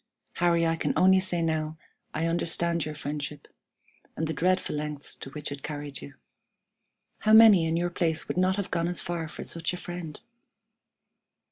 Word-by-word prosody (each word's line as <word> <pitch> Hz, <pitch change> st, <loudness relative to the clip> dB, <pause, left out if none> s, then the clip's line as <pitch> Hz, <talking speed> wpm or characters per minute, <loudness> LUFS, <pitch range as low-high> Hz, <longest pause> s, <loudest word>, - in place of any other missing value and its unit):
Harry, 170 Hz, -1 st, +3 dB
I 165 Hz, 0 st, +1 dB
can -, -, 0 dB
only 190 Hz, +1 st, +6 dB
say 185 Hz, -2 st, -1 dB
that -, -, +1 dB
now 155 Hz, -1 st, -1 dB, 0.3 s
I 160 Hz, +2 st, -1 dB
understand 170 Hz, 0 st, 0 dB
your 155 Hz, 0 st, -5 dB
friendship, 145 Hz, 0 st, -5 dB, 0.7 s
and 160 Hz, -, 0 dB
the 160 Hz, -, -2 dB
dreadful 185 Hz, +3 st, +1 dB
lengths 150 Hz, -1 st, -3 dB
to -, -, -8 dB
which 150 Hz, +1 st, -5 dB
it 140 Hz, -1 st, -6 dB
carried 145 Hz, -3 st, -6 dB
you. 70 Hz, -, -10 dB, 1.0 s
How 215 Hz, -, +3 dB
many 215 Hz, -7 st, +8 dB
in 160 Hz, +1 st, 0 dB
your 175 Hz, +1 st, -1 dB
place 165 Hz, -2 st, -1 dB
would -, -, -3 dB
not 185 Hz, +1 st, +2 dB
have 200 Hz, -2 st, -4 dB
gone 170 Hz, -1 st, 0 dB
as 175 Hz, 0 st, -1 dB
far 170 Hz, -3 st, -3 dB
for -, -, -8 dB
such 170 Hz, +1 st, -3 dB
a -, -, -4 dB
friend? 175 Hz, -4 st, -7 dB
165 Hz, 180 wpm, -27 LUFS, 150-175 Hz, 1.0 s, many